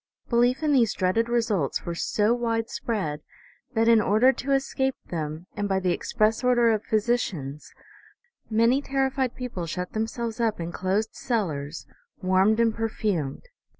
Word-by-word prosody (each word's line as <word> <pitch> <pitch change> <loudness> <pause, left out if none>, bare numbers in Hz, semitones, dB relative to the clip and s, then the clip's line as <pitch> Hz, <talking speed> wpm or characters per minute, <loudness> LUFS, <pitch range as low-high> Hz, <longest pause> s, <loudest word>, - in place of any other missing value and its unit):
Belief 245 +4 +2
in 300 -1 +2
these 235 -5 +3
dreaded 205 +5 +1
results 215 - 0
were 170 - -3
so 210 +6 +1
widespread, 225 -8 -2 0.5
that, 225 +1 +3
in 230 -2 +6
order 220 +6 +4
to 275 +1 -4
escape 270 -1 +1 0.2
them, 155 0 -4
and 205 0 -2
by 190 0 +2
the 185 -1 0
express 220 +5 0
order 240 -2 +4
of 215 -1 0
physicians, 200 - -1 0.8
many 230 +5 +3
terrified 270 -2 -1
peo 250 -1 -5
ple 175 -7 -5
shut 180 +2 -4
themselves 225 +1 -3
up 225 -4 0
in 170 0 -4
closed 195 +5 -1
cellars, 165 - -3 0.3
warmed 190 +4 +3
and 230 -1 +3
per 225 0 -2
fumed. 175 -11 -2
220 Hz, 150 wpm, -26 LUFS, 185-240 Hz, 0.8 s, in